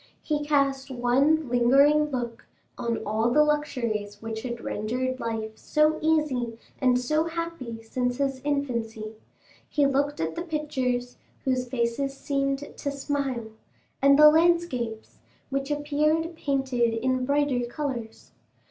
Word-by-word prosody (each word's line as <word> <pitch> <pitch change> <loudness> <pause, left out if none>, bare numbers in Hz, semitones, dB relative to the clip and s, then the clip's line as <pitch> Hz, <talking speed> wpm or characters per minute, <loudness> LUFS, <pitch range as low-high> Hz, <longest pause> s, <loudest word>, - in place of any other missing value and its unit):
He 295 -1 -1
cast 275 -2 +1
one 265 +5 +2
lingering 275 +5 +5
look 240 -4 -4 0.3
on 235 -2 -2
all 220 +3 +1
the 300 +5 +5
luxuries 235 -9 -1
which 225 0 -5
had 235 -1 -5
rendered 255 +5 -2
life 220 -1 -3
so 305 +1 +2
easy 285 -8 +1 0.2
and 250 -1 +3
so 305 +6 +1
happy 330 -9 -5
since 245 +2 -2
his 270 -2 -1
infancy; 235 -7 -2 0.6
he 290 -1 +2
looked 280 +1 +1
at 160 0 -1
the - - -3
pictures, 265 -7 -2 0.3
whose 255 -1 0
faces 260 +3 -1
seemed 275 0 -2
to 285 - -3
smile, 275 -4 -2 0.5
and 280 0 +6
the 300 0 +9
landscapes, 315 -9 +1 0.3
which 275 +1 -2
appeared 305 +3 0
painted 265 -6 0
in 255 +2 0
brighter 280 -2 +1
colors. 240 -4 -5
265 Hz, 130 wpm, -26 LUFS, 235-295 Hz, 0.6 s, the